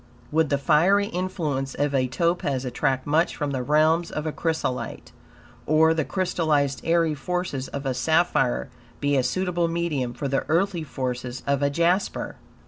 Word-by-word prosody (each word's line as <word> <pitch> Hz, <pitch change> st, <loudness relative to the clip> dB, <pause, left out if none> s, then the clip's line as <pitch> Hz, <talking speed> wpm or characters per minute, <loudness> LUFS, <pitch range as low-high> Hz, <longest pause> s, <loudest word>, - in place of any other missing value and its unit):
Would 160 Hz, -1 st, +2 dB
the 140 Hz, -, +2 dB
fiery 175 Hz, +9 st, +3 dB
influence 165 Hz, -8 st, -3 dB
of 145 Hz, 0 st, 0 dB
a 130 Hz, -2 st, +2 dB
topaz 140 Hz, -2 st, 0 dB
attract 130 Hz, +1 st, -1 dB
much 160 Hz, +4 st, +2 dB
from 145 Hz, -2 st, -2 dB
the 130 Hz, -2 st, -2 dB
realms 155 Hz, +5 st, +3 dB
of 155 Hz, -, -4 dB
a 155 Hz, -, -1 dB
chrysolite? 160 Hz, -6 st, -3 dB, 0.6 s
Or, 160 Hz, +1 st, +5 dB
the 160 Hz, -1 st, 0 dB
crystallized, 155 Hz, -6 st, 0 dB
airy 165 Hz, -1 st, +2 dB
forces 150 Hz, -2 st, -3 dB
of 140 Hz, 0 st, -6 dB
a 135 Hz, -, 0 dB
sapphire 135 Hz, -1 st, +1 dB, 0.3 s
be 145 Hz, 0 st, +1 dB
a 135 Hz, -, +4 dB
suitable 175 Hz, +3 st, 0 dB
medium 160 Hz, -8 st, -2 dB
for 140 Hz, -, -3 dB
the 135 Hz, 0 st, 0 dB
earthly 175 Hz, +2 st, +1 dB
forces 125 Hz, -4 st, -4 dB
of 140 Hz, -1 st, +1 dB
a 140 Hz, -, +3 dB
jasper? 170 Hz, +6 st, 0 dB
150 Hz, 160 wpm, -25 LUFS, 135-170 Hz, 0.6 s, Or